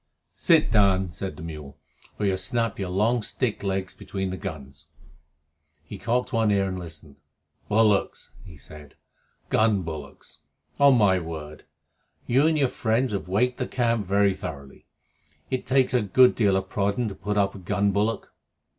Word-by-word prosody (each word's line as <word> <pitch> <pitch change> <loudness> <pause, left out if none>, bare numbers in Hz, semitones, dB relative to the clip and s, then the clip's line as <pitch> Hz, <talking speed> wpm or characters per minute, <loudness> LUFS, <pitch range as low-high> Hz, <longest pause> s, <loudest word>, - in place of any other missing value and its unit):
"Sit 165 - +3
down," 95 -4 +3
said 95 +4 -6
the 80 - -9
mule, 75 -4 -8 0.4
"or 105 - -1
you'll 95 -1 +2
snap 115 +4 -1
your 95 -2 -3
long 110 +6 +1
stick 115 +1 -2
legs 95 -1 -2
between 95 -1 -5
the - - -3
guns." 75 -3 -8 1.0
He 100 +6 -10
cocked 125 +4 -1
one 115 -2 +2
ear 100 -1 +2
and 95 -1 -4
listened. 80 -4 -9 0.5
"Bullocks!" 105 -1 +1
he 85 -6 -13
said. 75 +1 -14 0.5
"Gun 110 -4 +2
bullocks. 75 -3 -9 0.4
On 140 -2 +6
my 95 -4 +4
word, 80 -2 -8 0.6
you 135 +5 +3
and 160 -1 +2
your 140 -3 +3
friends 115 +2 0
have 100 -2 -3
waked 125 +7 0
the - - -2
camp 115 -5 0
very 100 0 +3
thoroughly. 70 -6 -9 0.6
It 130 - -2
takes 130 -1 +2
a 125 - +3
good 125 +5 +5
deal 100 -4 +2
of 95 0 -3
prodding 100 +4 -1
to - - -7
put 105 +2 -4
up 100 -1 +2
a - - -10
gun 100 +3 0
bullock." 105 +3 -1
100 Hz, 165 wpm, -25 LUFS, 90-115 Hz, 1.0 s, On